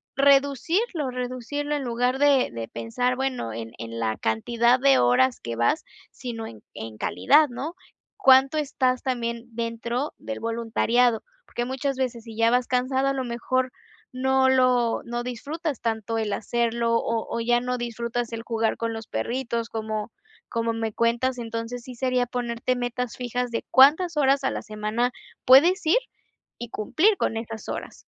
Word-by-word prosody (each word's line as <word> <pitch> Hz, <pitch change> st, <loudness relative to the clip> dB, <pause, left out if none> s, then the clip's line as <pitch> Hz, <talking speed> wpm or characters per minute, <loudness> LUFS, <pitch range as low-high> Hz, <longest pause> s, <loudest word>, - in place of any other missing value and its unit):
reducirlo 280 Hz, -, +2 dB
reducirlo 255 Hz, +4 st, -3 dB
en 290 Hz, -, -2 dB
lugar 245 Hz, +2 st, 0 dB
de 280 Hz, -3 st, +4 dB
de 115 Hz, -1 st, -5 dB
pensar, 115 Hz, -, -1 dB
bueno, 260 Hz, -, -2 dB
en 115 Hz, 0 st, -6 dB
en 115 Hz, 0 st, -6 dB
la 110 Hz, -1 st, -1 dB
cantidad 235 Hz, -, +2 dB
de 275 Hz, +1 st, +5 dB
horas 125 Hz, +1 st, +3 dB
que 115 Hz, 0 st, -5 dB
vas, 120 Hz, -, +1 dB, 0.3 s
sino 230 Hz, -3 st, -6 dB
en 110 Hz, -2 st, -12 dB
en 110 Hz, -1 st, -7 dB
calidad, 295 Hz, -, +4 dB
¿no? 275 Hz, +7 st, -5 dB, 0.4 s
Cuánto 270 Hz, -5 st, +5 dB
estás 260 Hz, -3 st, 0 dB
también 235 Hz, -2 st, -2 dB
dentro 235 Hz, +4 st, -3 dB
del 275 Hz, -, -6 dB
voluntariado, 230 Hz, +1 st, +1 dB, 0.2 s
porque 240 Hz, -, -3 dB
muchas 265 Hz, +1 st, -2 dB
veces 245 Hz, -3 st, -2 dB
si 225 Hz, -1 st, -9 dB
ya 230 Hz, 0 st, +4 dB
vas 250 Hz, 0 st, +2 dB
cansado, 260 Hz, +2 st, +1 dB
a 275 Hz, -, +2 dB
lo 265 Hz, -1 st, -2 dB
mejor 255 Hz, +2 st, -1 dB, 0.4 s
no 265 Hz, +1 st, +3 dB
lo 255 Hz, -3 st, +3 dB
no 240 Hz, 0 st, -4 dB
disfrutas 285 Hz, +4 st, -4 dB
tanto 225 Hz, -1 st, -2 dB
el 215 Hz, -2 st, -2 dB
hacerlo, 235 Hz, +1 st, 0 dB
o 230 Hz, -1 st, -1 dB
o, -, -, -2 dB
ya 240 Hz, +1 st, +3 dB
no 250 Hz, 0 st, -2 dB
disfrutas 235 Hz, 0 st, -3 dB
el 225 Hz, 0 st, -4 dB
jugar 225 Hz, -1 st, 0 dB
con 230 Hz, 0 st, -2 dB
los 225 Hz, -1 st, -7 dB
perritos, 235 Hz, -, -2 dB
como 215 Hz, 0 st, -4 dB, 0.4 s
como 230 Hz, -1 st, -1 dB
me 225 Hz, -1 st, -3 dB
cuentas, 235 Hz, +3 st, +1 dB
entonces, 230 Hz, +1 st, -5 dB
sí 255 Hz, -1 st, -9 dB
sería 255 Hz, 0 st, +1 dB
ponerte 245 Hz, +1 st, -2 dB
metas 245 Hz, -1 st, -3 dB
fijas 245 Hz, 0 st, -2 dB
de 230 Hz, -, -3 dB
cuántas 315 Hz, +6 st, +6 dB
horas 275 Hz, -1 st, +3 dB
a -, -, +1 dB
la -, -, -4 dB
semana 215 Hz, +3 st, -1 dB, 0.3 s
puedes 330 Hz, +9 st, +6 dB
ir 320 Hz, +9 st, +5 dB, 0.6 s
y 240 Hz, -, -6 dB
cumplir 335 Hz, -, +2 dB
con 225 Hz, -, -1 dB
estas 225 Hz, -1 st, -6 dB
horas. -, -, -6 dB
240 Hz, 165 wpm, -25 LUFS, 230-265 Hz, 0.6 s, cuántas